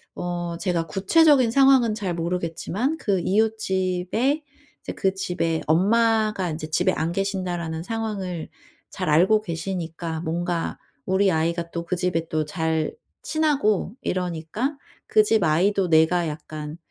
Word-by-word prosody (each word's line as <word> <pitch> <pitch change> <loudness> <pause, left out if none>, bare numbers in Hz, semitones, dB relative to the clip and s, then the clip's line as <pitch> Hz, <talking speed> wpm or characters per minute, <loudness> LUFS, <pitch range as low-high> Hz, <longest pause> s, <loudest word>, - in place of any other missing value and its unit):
어 175 -1 -3
제가 170 -3 -1
구체적인 255 - +4
상황은 265 -4 +5
잘 195 -5 -3
모르겠지만 180 - -2
그 200 - 0
이웃집에 210 - 0 0.4
이제 - - -6
그 190 -1 0
집에 175 -4 -1
엄마가 215 +2 +2
인제 155 0 -5
집에 180 +3 +2
안 165 +2 -1
계신다라는 175 -4 -2
상황을 195 -6 -4 0.4
잘 185 -4 -4
알고 190 +8 +4
계시니까 165 -2 -4
뭔가 170 +1 -2 0.3
우리 190 0 +2
아이가 170 +1 -1
또 170 0 -5
그 180 - -1
집에 170 -2 -1
또 155 -1 0
잘 160 -1 -1 0.3
친하고 275 - +1
이러니까 180 - -2 0.3
그 215 - +5
집 215 -3 +2
아이도 180 +4 +2
내가 160 +1 +4
약간 150 0 -7
180 Hz, 275 characters per minute, -24 LUFS, 165-210 Hz, 0.4 s, 상황은